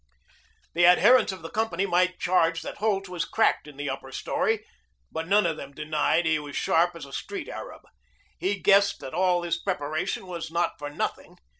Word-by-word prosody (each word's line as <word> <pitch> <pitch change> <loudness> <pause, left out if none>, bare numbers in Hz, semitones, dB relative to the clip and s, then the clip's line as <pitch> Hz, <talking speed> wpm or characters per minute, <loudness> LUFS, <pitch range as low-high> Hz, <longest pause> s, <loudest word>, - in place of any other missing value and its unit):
The 175 - +2
adherents 210 +7 +6
of 190 -2 -9
the 165 - -7
company 200 -4 0
might 180 -1 +1
charge 165 -2 +2
that - - -7
Holt 200 -2 0
was 180 -2 -3
cracked 220 -7 +1
in 145 -2 -12
the 145 0 -4
upper 135 0 -7
story, 220 +10 -1 0.5
but 160 0 -4
none 205 +2 +4
of 165 -2 0
them 140 - -9
denied 155 +2 +1
he 160 -1 +2
was 145 -1 -8
sharp 170 +1 +2
as 165 - -8
a 135 - -14
street - - -5
Arab. - - -8 0.6
He 195 +1 -1
guessed 200 0 +4
that 130 - -8
all 180 -1 +2
this 170 0 -1
preparation 155 -1 -2
was 170 -3 -6
not 170 +1 -1
for 145 0 -5
nothing. 145 - -4
175 Hz, 190 wpm, -26 LUFS, 155-190 Hz, 0.6 s, adherents